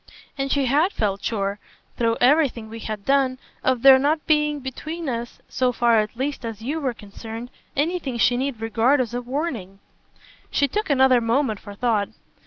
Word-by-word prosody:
And 275 Hz, -1 st, -2 dB
she 280 Hz, -2 st, +2 dB
HAD 300 Hz, +9 st, +2 dB
felt 200 Hz, -2 st, -1 dB
sure 200 Hz, -2 st, -2 dB, 0.4 s
through 230 Hz, -1 st, +1 dB
everything 250 Hz, -4 st, +3 dB
we 225 Hz, +1 st, -8 dB
had 215 Hz, -2 st, -6 dB
done 270 Hz, -2 st, +2 dB, 0.3 s
of 255 Hz, -2 st, +1 dB
there 265 Hz, -1 st, +9 dB
not 300 Hz, +3 st, +1 dB
being 300 Hz, -1 st, +2 dB
between 310 Hz, +5 st, -6 dB
us, 240 Hz, -2 st, -4 dB
so 255 Hz, -1 st, +1 dB
far 235 Hz, -2 st, +3 dB
at 215 Hz, +1 st, -2 dB
least 275 Hz, +1 st, -3 dB
as 225 Hz, -2 st, -5 dB
you 295 Hz, +7 st, -2 dB
were 260 Hz, -5 st, -2 dB
concerned, 225 Hz, +4 st, -9 dB, 0.3 s
anything 295 Hz, -4 st, -1 dB
she 245 Hz, +1 st, +3 dB
need 255 Hz, -2 st, -2 dB
regard 230 Hz, +5 st, +2 dB
as 240 Hz, -3 st, -1 dB
a 245 Hz, -, -2 dB
warning." 245 Hz, -, -4 dB, 0.7 s
She 280 Hz, -, +2 dB
took 425 Hz, +6 st, -2 dB
another 265 Hz, -3 st, +5 dB
moment 230 Hz, -2 st, 0 dB
for 205 Hz, -1 st, -10 dB
thought. 215 Hz, -3 st, 0 dB
250 Hz, 180 wpm, -23 LUFS, 225-280 Hz, 0.7 s, there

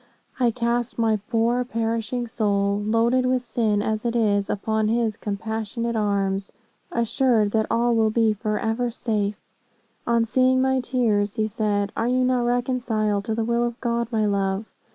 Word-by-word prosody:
I 245 Hz, -2 st, +4 dB
cast 235 Hz, +1 st, -1 dB
my 225 Hz, -2 st, +2 dB
poor 235 Hz, +2 st, +2 dB
perishing 230 Hz, 0 st, -2 dB
soul, 205 Hz, -3 st, 0 dB
loaded 230 Hz, +4 st, +2 dB
with 255 Hz, -1 st, +1 dB
sin, 220 Hz, -3 st, 0 dB
as 215 Hz, 0 st, -1 dB
it 235 Hz, 0 st, -1 dB
is, 205 Hz, -3 st, +1 dB
upon 220 Hz, +1 st, 0 dB
his 225 Hz, -1 st, +1 dB
compassionate 220 Hz, +2 st, -3 dB
arms, 200 Hz, -2 st, 0 dB, 0.4 s
assured 230 Hz, -2 st, +2 dB
that 220 Hz, 0 st, +1 dB
all 240 Hz, +1 st, +2 dB
will 220 Hz, -1 st, +3 dB
he 220 Hz, 0 st, +2 dB
forever 225 Hz, +3 st, -1 dB
safe.' 215 Hz, -3 st, -2 dB, 0.6 s
On 235 Hz, -1 st, +3 dB
seeing 255 Hz, +2 st, +3 dB
my 265 Hz, 0 st, +2 dB
tears, 225 Hz, -5 st, 0 dB
he 215 Hz, -, +1 dB
said, 205 Hz, -2 st, -1 dB
'Are 225 Hz, -, 0 dB
you 255 Hz, +1 st, +2 dB
not 250 Hz, -1 st, +1 dB
reconciled 240 Hz, -4 st, 0 dB
to 220 Hz, -, -1 dB
the 225 Hz, 0 st, -1 dB
will 235 Hz, +1 st, +1 dB
of 240 Hz, 0 st, -3 dB
God, 235 Hz, -1 st, -1 dB
my 220 Hz, -2 st, +1 dB
love?' 195 Hz, 0 st, 0 dB
225 Hz, 160 wpm, -24 LUFS, 210-240 Hz, 0.6 s, I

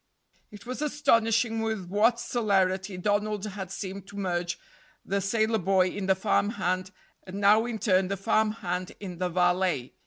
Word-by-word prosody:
It 210 Hz, +2 st, -13 dB
was 255 Hz, +3 st, -5 dB
astonishing 225 Hz, -6 st, +2 dB
with 220 Hz, -4 st, -2 dB
what 215 Hz, +6 st, +2 dB
celerity 195 Hz, -5 st, 0 dB
Donald 205 Hz, +2 st, 0 dB
had 195 Hz, -3 st, -6 dB
seemed 195 Hz, 0 st, -6 dB
to 205 Hz, -, -11 dB
merge 175 Hz, -3 st, -2 dB, 0.5 s
the 200 Hz, +1 st, -1 dB
sailor 220 Hz, +2 st, +1 dB
boy 185 Hz, 0 st, +3 dB
in 195 Hz, 0 st, -4 dB
the 190 Hz, -, +4 dB
farm 205 Hz, +1 st, +1 dB
hand, 185 Hz, -4 st, -2 dB, 0.4 s
and 190 Hz, +2 st, -6 dB
now 210 Hz, +3 st, +5 dB
in 235 Hz, -2 st, -3 dB
turn 190 Hz, -3 st, +2 dB
the 200 Hz, +1 st, -2 dB
farm 215 Hz, +3 st, +2 dB
hand 180 Hz, -3 st, -4 dB
in 180 Hz, -4 st, -7 dB
the 180 Hz, -1 st, 0 dB
valet. 180 Hz, -6 st, +1 dB
200 Hz, 165 wpm, -27 LUFS, 185-220 Hz, 0.5 s, now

